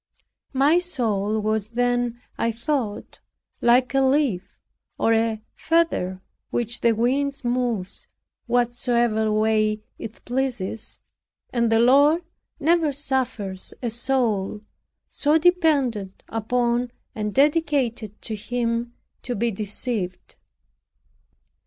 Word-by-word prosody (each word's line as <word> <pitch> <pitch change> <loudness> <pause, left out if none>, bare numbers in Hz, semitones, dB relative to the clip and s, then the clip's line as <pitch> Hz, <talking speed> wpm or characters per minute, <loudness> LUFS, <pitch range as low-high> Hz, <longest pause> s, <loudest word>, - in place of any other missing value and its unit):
My 290 +6 +4
soul 220 - -1
was 215 0 -1
then, 245 0 0 0.2
I 230 - 0
thought, 235 -2 -3 0.4
like 245 +2 +4
a 270 - +3
leaf, 265 -8 +1 0.4
or 225 - +2
a 225 -1 0
feather, 315 - 0 0.3
which 240 0 +1
the 235 -1 +4
wind 270 +5 0
moves 240 -6 -1 0.4
what 240 0 +2
way - - -24
soever 220 -3 +2 0.2
it 225 0 -9
pleases 245 -5 -1 0.6
and 235 -2 +1
the 225 - +4
Lord 285 +8 +5 0.4
never 320 0 +3
suffers 260 -9 -2
a 235 - -1
soul 225 -5 0 0.5
so 295 +2 +2
dependent 290 - +1
upon, 240 +2 0 0.2
and 210 -1 -3
dedicated 270 - +1
to 220 - -2
Him, 235 +2 -2 0.3
to 245 - -4
be 235 +3 0
deceived. 205 -2 -1
235 Hz, 105 wpm, -23 LUFS, 215-265 Hz, 0.6 s, Lord